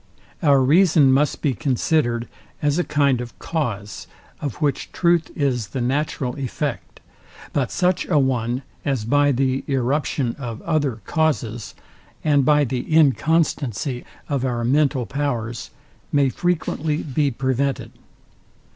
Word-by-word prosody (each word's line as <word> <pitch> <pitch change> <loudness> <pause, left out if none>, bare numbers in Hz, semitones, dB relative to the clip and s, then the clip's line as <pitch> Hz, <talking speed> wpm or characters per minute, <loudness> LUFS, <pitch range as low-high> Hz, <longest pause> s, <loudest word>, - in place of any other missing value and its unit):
Our 140 -5 +4
reason 155 -1 +5
must 145 +3 +1
be 145 -4 +2
considered 120 0 0 0.3
as 150 +2 +1
a - - +2
kind 140 -5 +2
of 120 -1 -9
cause, 110 - -4 0.3
of 140 -7 -4
which 145 -3 -1
truth 170 -2 +2
is 130 -7 0
the 100 - -5
natural 130 0 -1
effect; 130 -3 -4 0.5
but 130 -4 0
such 180 0 +1
a 160 - +2
one 125 -2 0 0.2
as 135 -6 -1
by 145 +4 +3
the 130 0 0
irruption 135 -1 0
of 115 -4 -5
other 145 -8 0
causes, 120 -8 -1 0.5
and 145 -2 +3
by 150 +2 +4
the 125 -1 -1
inconstancy 145 - +2 0.2
of 140 -3 -1
our 120 -2 -1
mental 135 0 +2
powers, 120 -5 -3 0.4
may 140 -2 +3
frequently 160 -1 -1
be 145 0 0
prevented. 130 0 -1
140 Hz, 130 wpm, -22 LUFS, 125-150 Hz, 0.5 s, reason